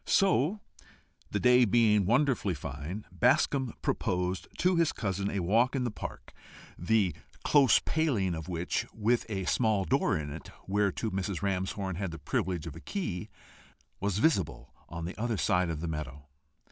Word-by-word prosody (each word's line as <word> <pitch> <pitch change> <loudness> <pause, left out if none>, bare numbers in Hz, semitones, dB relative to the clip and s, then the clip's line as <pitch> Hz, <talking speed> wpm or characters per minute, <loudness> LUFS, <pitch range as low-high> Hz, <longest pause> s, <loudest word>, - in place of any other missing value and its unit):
So, 190 0 +3 0.7
the - - -1
day 125 0 +6
being 105 -3 +4
wonderfully 120 - +2
fine, 75 +8 -6
Bascombe 125 - +2
proposed 90 0 -1
to 180 +1 +3
his 170 -2 +2
cousin 100 -1 -2
a 100 - -2
walk 115 +9 +2
in 130 - 0
the 120 - -1
park, - - -8 0.4
the 100 -1 +1 0.3
close 140 -4 +5
paling 125 - 0
of 80 -1 -6
which, 85 0 -2
with 115 +2 +1
a 95 -3 -2
small 110 -2 +2
door 135 - +2
in 75 -2 -5
it, 80 - -8 0.2
whereto 105 +2 0
Mrs. 95 0 -3
Ramshorn 95 -1 -2
had 95 -1 -2
the 80 - -7
privilege 85 +3 -2
of 80 - -7
a - - -8
key, 135 - -4 0.7
was 100 -1 -1
visible 110 - 0 0.2
on 85 -1 -5
the 90 - -5
other 115 -2 0
side 90 -1 +2
of 80 -2 -3
the 85 - -3
meadow. 75 -3 -5
100 Hz, 160 wpm, -30 LUFS, 90-120 Hz, 0.7 s, day